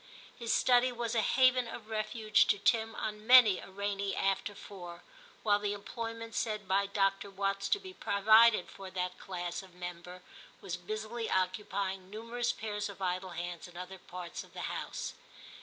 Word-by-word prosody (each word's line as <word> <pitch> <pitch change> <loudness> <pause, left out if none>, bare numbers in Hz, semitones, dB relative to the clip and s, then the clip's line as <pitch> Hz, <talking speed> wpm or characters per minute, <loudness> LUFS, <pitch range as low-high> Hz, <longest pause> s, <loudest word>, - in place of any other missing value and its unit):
His 235 -1 -3
study 250 0 +4
was 235 -1 -3
a 230 - +3
haven 255 +1 +4
of 225 -1 -8
refuge 215 -1 +2
to 205 - +3
Tim 225 +2 +2
on 215 0 -4
many 245 -6 +8
a - - -10
rainy 200 0 -2
after 195 +1 0
four, 175 -4 -10 0.4
while 205 -2 +4
the 205 0 -1
employment 230 +2 -6
said 215 -3 -2
by 195 +1 +2
Dr. 195 0 +1
Watts 195 0 -1
to 405 - +3
be 375 -1 -10
provided 215 - +5
for 195 -1 -9
that 180 -1 -3
class 175 -2 -4
of 185 -2 -16
member 180 0 -8 0.4
was 185 -3 -4
busily 215 +5 -4
occupying 190 0 -1
numerous 230 +3 -2
pairs 210 -2 -4
of 200 - -10
idle 185 0 -1
hands 175 0 -5
in 175 -1 -13
other 185 +1 -7
parts 175 -1 -7
of - - -19
the - - -6
vr - - -2
TIM - - -3
117 - - -4
house. - - -5
200 Hz, 180 wpm, -32 LUFS, 185-225 Hz, 0.4 s, many